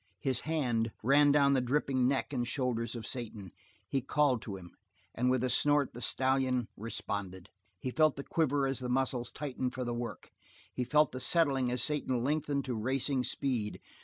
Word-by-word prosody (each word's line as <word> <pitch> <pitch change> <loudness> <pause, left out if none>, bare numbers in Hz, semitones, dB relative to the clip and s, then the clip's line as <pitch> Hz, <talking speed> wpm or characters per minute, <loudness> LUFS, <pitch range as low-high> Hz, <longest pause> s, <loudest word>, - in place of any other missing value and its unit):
He 135 - -1
ran - - +2
his 120 - 0
hand 125 -8 0 0.4
down 140 -1 +4
the 130 - +3
dripping 130 0 +1
neck 135 +2 0
and 120 -2 -1
shoulder 125 -3 -1
of 115 - -6
Satan; 110 -6 -6 0.4
he 135 +7 0
called 135 -2 +2
to 100 -2 -6
him; 90 -2 -12 0.4
and 125 +2 +1
with 130 -1 +2
a 130 - +1
snort 145 +2 +2
the 120 - -8
stallion 130 -3 +1
responded. 100 -4 -5 0.3
He 130 +7 -4
felt 155 +1 +3
the 140 - -6
quiver 145 -4 +1
as 135 -1 -1
the 125 -1 -4
muscles 125 -1 0
tightened 130 -3 -4
for 130 - -2
the 120 -1 -2
work; 120 -4 -6 0.4
he 125 - -1
felt 150 +2 +3
the 130 - -5
settling 135 -3 +3
as 125 0 0
Satan 130 -5 0
lengthened 145 0 0
to 130 - -2
racing 130 +3 0
speed. 120 -6 -2
130 Hz, 190 wpm, -32 LUFS, 120-140 Hz, 0.4 s, down